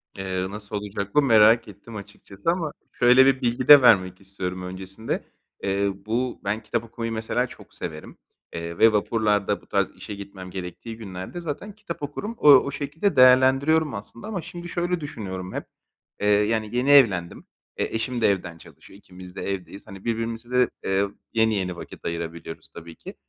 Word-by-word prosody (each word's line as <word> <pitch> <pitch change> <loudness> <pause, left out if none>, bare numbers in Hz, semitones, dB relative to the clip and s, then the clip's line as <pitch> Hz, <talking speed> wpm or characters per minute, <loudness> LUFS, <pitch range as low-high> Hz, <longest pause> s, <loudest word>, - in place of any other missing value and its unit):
Eee, 95 -1 -3
nasıl 105 0 -8
olacak 100 -1 -5
bu 150 - +6
merak 115 -2 +5
ettim 105 +3 -12
açıkçası 100 - -4
ama 165 -4 -2 0.2
şöyle 125 +2 +6
bir 135 -1 +3
bilgi 120 +1 -1
de 145 -2 +11
vermek 95 -6 +4
istiyorum. 95 -1 -5
Öncesinde, 95 +4 -5 0.4
eee, 100 +1 +1 0.2
bu 120 +3 -2
ben 105 +3 -2
kitap 120 -1 -2
okumayı 115 0 -5
mesela 115 +3 -1
çok - - -15
severim, 75 0 -8 0.4
eee, 85 0 -5
ve 115 - +6
vapurlarda 105 -1 +1
bu - - -23
tarz - - +1
işe 105 - -8
gitmem 95 -2 -9
gerektiği 95 +5 -7
günlerde 95 - -7
zaten 170 +6 -6
kitap 190 -8 -8
okurum. 205 +11 -5
O 150 - +6
o 140 +1 +6
şekilde 150 +6 -2
değerlendiriyorum 130 +4 +5
aslında 110 - -8
ama 195 -6 -3
şimdi 175 0 -9
şöyle 175 0 -1
düşünüyorum 95 -10 -6
hep, - - -4 0.6
eee, 105 - +1
yani, 105 +2 +1
yeni 125 +3 +1
evlendim, 95 -12 +4 0.3
e, - - 0
eşim 120 +2 -3
de - - +5
evden 85 -3 -4
çalışıyor, 95 - -16
ikimiz 90 -1 -13
de - - -5
evdeyiz. 95 +1 -7
Hani, 95 +2 -11
birbirimize 115 +1 -3
de, 125 0 +3
eee, 95 +1 +1 0.3
yeni 110 -1 +3
yeni 90 -2 -2
vakit - - -11
ayırabiliyoruz 85 -1 -6
tabii 85 0 -10
ki. - - -11
110 Hz, 175 wpm, -24 LUFS, 95-130 Hz, 0.6 s, de